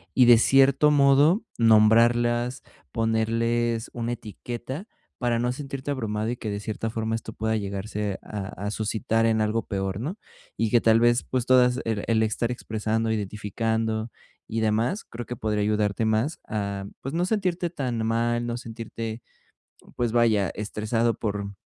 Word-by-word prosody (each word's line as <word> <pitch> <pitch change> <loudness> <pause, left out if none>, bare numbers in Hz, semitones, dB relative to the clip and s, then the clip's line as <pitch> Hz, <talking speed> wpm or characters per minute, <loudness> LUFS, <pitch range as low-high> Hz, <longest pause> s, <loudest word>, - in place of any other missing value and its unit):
Y, 125 - +6
de 120 -1 +8
cierto 135 +4 +5
modo, 145 - +4 0.2
nombrarlas, 120 +2 +4 0.3
ponerles 115 +1 0
una 120 0 -2
etiqueta 120 - -7 0.3
para 120 -1 +1
no 120 +1 0
sentirte 135 +1 -5
abrumado 110 -5 -2
y - - -2
que 110 - -5
de 100 0 -3
cierta 110 +2 -4
forma 110 0 -2
esto 115 0 -4
pueda 110 0 -1
llegarse 100 0 -3
a 100 -3 -5 0.2
a 105 - -1
suscitar 110 +1 0
en 110 -1 +2
algo 110 +1 +1
peor, 95 0 -2
¿no? 155 - -4 0.4
Y 110 -1 0
que 120 - +5
tal 115 0 +5
vez, 120 +1 +4
pues 125 -2 -2
todas 125 0 +4
el 110 -3 -1
el 110 -1 +3
estar 110 +2 -1
expresando, 110 -1 -2
identificando 110 +2 -2 0.4
y 115 - -2
demás, 110 - 0
creo 120 +1 -7
que 125 - -4
podría 110 -3 -1
ayudarte 105 0 0
más 110 +8 0
a, 100 -2 -3 0.2
pues, 135 - -6
no 170 +2 +1
sentirte 185 -4 0
tan 125 -8 -2
mal, 120 +1 0
no 120 0 -3
sentirte, 115 -1 -6 0.7
pues, 120 -2 0
vaya, 110 -5 +3
estresado 110 +2 -1
por 100 -3 -4
115 Hz, 160 wpm, -25 LUFS, 110-120 Hz, 0.7 s, de